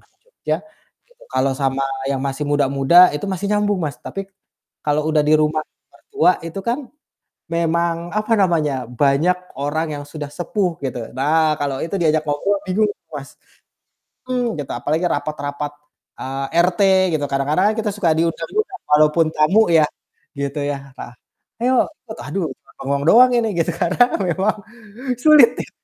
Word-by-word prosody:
orang - - -31
Jogja - - -3 0.5
gitu - - -26
kalau 130 +1 +1
sama 135 0 0 0.3
yang 135 - 0
masih 140 +1 -3
muda-muda 140 +3 +3 0.2
itu 150 - -6
masih 190 +1 -3
nyambung 205 -1 +1
Mas, 145 -2 -3
tapi, 195 0 -6 0.6
kalau 150 +1 +1
udah 155 -1 +3
di 155 - +5
rumah 155 0 +1 0.3
mertua 410 - +1
itu 165 - -6
kan, 245 +2 -2 0.6
memang, 170 0 0
apa 215 +2 -2
namanya, 150 -9 +1
banyak 140 +8 +2 0.2
orang 155 +3 -1
yang 145 - -6
sudah 145 -1 -7
sepuh 175 +1 -2
gitu. 125 -4 -4
Nah 155 +2 +2
kalau 140 -2 -2
itu 165 +4 -4
diajak 155 -1 +2
ngobrol 195 +8 0
bingung 210 +3 +2
tuh 205 - -10
Mas. 140 -1 -7 1.0
Mmm, 245 -2 -1
gitu, 140 - -7
apalagi 150 +8 -1
rapat-rapat, 145 0 -3 0.5
eee, 135 +1 -4 0.2
RT 185 +2 -2 0.4
gitu, 145 - -2
kadang-kadang 145 +7 +1
kan - - -8
kita 215 -1 -1
suka 185 -5 +1
diundang 165 0 -1
juga 430 0 0 0.2
walaupun 155 +2 +4
tamu 185 +9 +4
ya, 155 -2 +6 0.5
gitu 140 +1 -3
ya, 140 -2 -5
heeh, 120 - -9 0.5
"Ayo" 255 +2 +2 0.3
itu 220 +1 -8
aduh 165 +5 -2
cuman - - -25
bengong 140 +1 -1
doang 250 +2 +7
ini 230 - +1
gitu 170 +1 +1
karena 175 +7 +3 0.2
memang 190 +3 0 0.7
sulit 300 -6 +8
nih. - - -6
155 Hz, 160 wpm, -20 LUFS, 145-195 Hz, 1.0 s, sulit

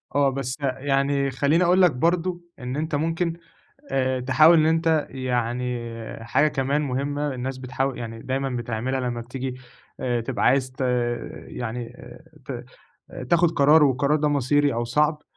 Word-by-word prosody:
آه، 140 -1 +4
بس 135 -1 -3
يعني 140 +1 0
خلّيني 145 +6 +2
أقول 180 +2 +4
لك 180 -3 +6
برضه 175 +6 0 0.2
إن 125 0 -4
أنت 155 +1 -2
ممكن 165 +3 0 0.6
آآ، 130 -1 0
تحاول 155 +6 +6
إن 155 - +4
أنت، 160 -1 +2
يعني 125 -1 -2 0.5
حاجة 130 +7 +3
كمان 140 +1 0
مهمّة 145 +1 -2
الناس 130 +1 -4
بتحاو 130 +1 -2
يعني 115 -1 -7
دايمًا 135 +1 -2
بتعملها، 120 +1 -2
لمّا 120 -2 -3
بتيجي 125 +2 -5 0.5
آآ، 120 -2 0
تبقى 120 +2 -2
عايز 130 0 +3
ت 130 - -16 0.7
يعني 120 0 -6 0.5
ت - - -6 0.7
تاخد 170 -1 +4
قرار، 150 0 +5
والقرار 140 +2 +2
ده 150 0 +1
مصيري 145 +1 +2
أو 120 +1 -1
صعب، 150 +5 +1
135 Hz, 150 wpm, -24 LUFS, 125-150 Hz, 0.7 s, لك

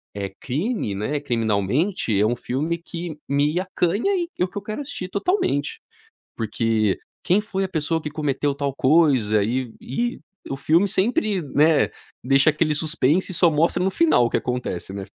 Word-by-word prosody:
eh 100 -1 -3
crime 150 - -2
né, 125 +9 -2
criminalmente, 115 - 0
é 105 - +3
um 120 +2 0
filme 150 +9 -2
que 170 -1 -7
me 145 +4 +1
acanha 190 - 0
e 345 -2 -1
o 180 - +3
que 185 - -10
eu 205 - -2
quero 215 +6 -5
assistir 270 -10 -6
totalmente. 200 - -1 0.6
Porque: 110 -2 0 0.3
"Quem 190 +4 +3
foi 195 -3 -2
a - - -6
pessoa 160 -1 -1
que 150 - -4
cometeu 145 -1 -1
tal 140 -1 -2
coisa?" 130 -8 +3
E 120 +2 -2
e 240 - -2 0.3
o 135 - -2
filme 165 +8 +3
sempre 210 - +1
né, 150 +1 +3 0.3
deixa 135 +3 +4
aquele 155 0 +1
suspense 155 +2 +1
e - - -3
só 170 -2 +4
mostra 165 +4 +2
no 190 - +1
final 315 - +4
o - - 0
que - - +1
acontece 125 -7 -3
né. 100 0 -5
150 Hz, 175 wpm, -23 LUFS, 125-185 Hz, 0.6 s, deixa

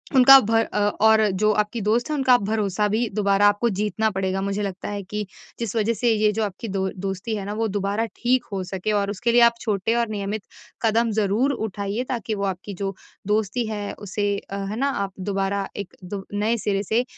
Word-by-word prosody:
उनका 270 +1 +10
भर 225 +1 +2
अ, - - +1
और 220 +1 +4
जो 215 +3 +2
आपकी 210 +2 -1
दोस्त 225 +7 +1
है 305 - 0
उनका 260 -3 +5
भरोसा 210 -1 0
भी 225 +3 +1
दोबारा 200 -1 +4
आपको 205 +3 +2
जीतना 210 +1 0
पड़ेगा, 190 0 -1
मुझे 200 +1 -2
लगता 195 -2 -4
है 205 -1 -4
कि 210 +2 -4 0.3
जिस 230 -2 -3
वज़ह 225 +1 +2
से 235 +2 +1
ये 215 -1 +3
जो 220 +1 -1
आपकी 205 +2 -4
दो 190 -1 -1 0.2
दोस्ती 195 +3 -3
है 200 -2 -4
ना 205 - -4
वो 225 +1 0
दोबारा 205 +2 -1
ठीक 250 +1 +1
हो 195 -2 -2
सके 190 +3 -3
और 200 -1 +1
उसके 235 +4 0
लिए 240 +1 +5
आप 235 0 +6
छोटे 215 +1 0
और 235 0 +1
नियमित 205 0 -3 0.4
कदम 230 0 +2
ज़रूर 215 +7 +2
उठाइए 210 -1 -3
ताकि 230 -3 -2
वो 200 - -3
आपकी 195 +1 -4
जो 195 +1 -3 0.3
दोस्ती 215 +3 0
है 210 -2 -4
उसे 205 +1 -3 0.2
अ, 200 - -3
है 200 +1 -4
ना? 275 +3 +1
आप 200 -7 -3
दोबारा 195 +1 -1
एक 200 -2 -6
दो 195 +1 -6
नए 215 +3 +1
सिरे 200 -2 -1
से 220 +5 +1
210 Hz, 215 wpm, -23 LUFS, 200-225 Hz, 0.4 s, उनका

